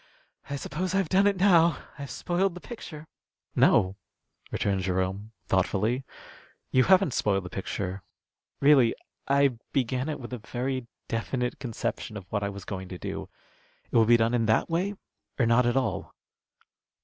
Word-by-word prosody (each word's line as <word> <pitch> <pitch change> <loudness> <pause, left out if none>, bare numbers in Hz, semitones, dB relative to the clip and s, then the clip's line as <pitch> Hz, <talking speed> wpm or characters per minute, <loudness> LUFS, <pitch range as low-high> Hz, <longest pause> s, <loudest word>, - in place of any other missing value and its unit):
"I 140 - -2
suppose 180 +6 -3
I've 195 -5 +1
done 195 +2 +4
it 200 -1 +2
now. 170 -5 +5 0.2
I've 140 -1 -6
spoiled 180 +1 0
the - - -7
picture." 165 -9 -9 0.5
"No," 95 +1 +4 0.5
returned 100 -1 0
Jerome, 95 +3 -2
thoughtfully, 105 +7 +1 0.7
"you 130 0 +4
haven't 190 -7 +5
spoiled 100 -2 +1
the 90 - -7
picture. 95 0 -4 0.6
Really 140 -5 +6 0.3
I 140 -3 +3
began 130 +2 0
it 150 - -3
with 125 -1 -8
a 125 - -4
very 125 +3 -3 0.2
definite 125 +2 -2
conception 115 -3 -4
of 100 - -9
what 105 - 0
I 100 - -1
was 100 -2 -8
going 95 -2 -5
to 90 - -7
do. - - -5 0.6
It - - -4
will 115 -1 +6
be 120 +1 +6
done 115 +1 +2
in 115 -2 +2
that 110 +9 +2
way 190 +5 0 0.4
or 120 - +3
not 115 +2 +4
at 120 +2 +2
all." 130 - -2
125 Hz, 160 wpm, -27 LUFS, 105-150 Hz, 0.7 s, Really